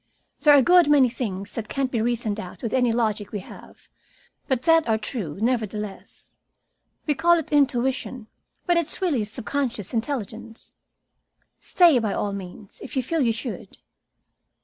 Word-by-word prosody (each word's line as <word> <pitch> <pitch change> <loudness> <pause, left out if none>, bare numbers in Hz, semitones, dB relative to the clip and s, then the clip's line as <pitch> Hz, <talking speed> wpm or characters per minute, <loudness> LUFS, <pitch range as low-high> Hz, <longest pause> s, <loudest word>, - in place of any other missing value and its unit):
"There 295 -2 +6
are - - +7
a 270 - +5
good 355 -1 +5
many 275 -4 +5
things 200 -5 -5
that 225 -2 -5
can't 270 -2 -1
be 230 - 0
reasoned 225 -2 -1
out 185 +3 -9
with 230 - -3
any 250 -2 +3
logic 215 -3 -1
we 205 - -4
have, - - -14 0.6
but 260 -3 0
that 325 -5 +4
are 220 - +3
true, 210 - -5
nevertheless. 215 -4 -3 0.7
We 300 - +2
call 340 +3 +4
it 320 -1 -5
intuition, 260 -3 0 0.4
but 350 -1 +2
it's 340 -1 -1
really 310 - 0
subconscious 225 -1 -4
intelligence. 230 -2 -5 0.9
Stay, 340 -8 +4
by 215 -3 -1
all 205 -1 -2
means, 195 +1 -9
if - - -9
you 260 - +1
feel 325 +5 -1
you 235 -3 +3
should." 230 +1 -6
240 Hz, 160 wpm, -24 LUFS, 215-285 Hz, 0.9 s, are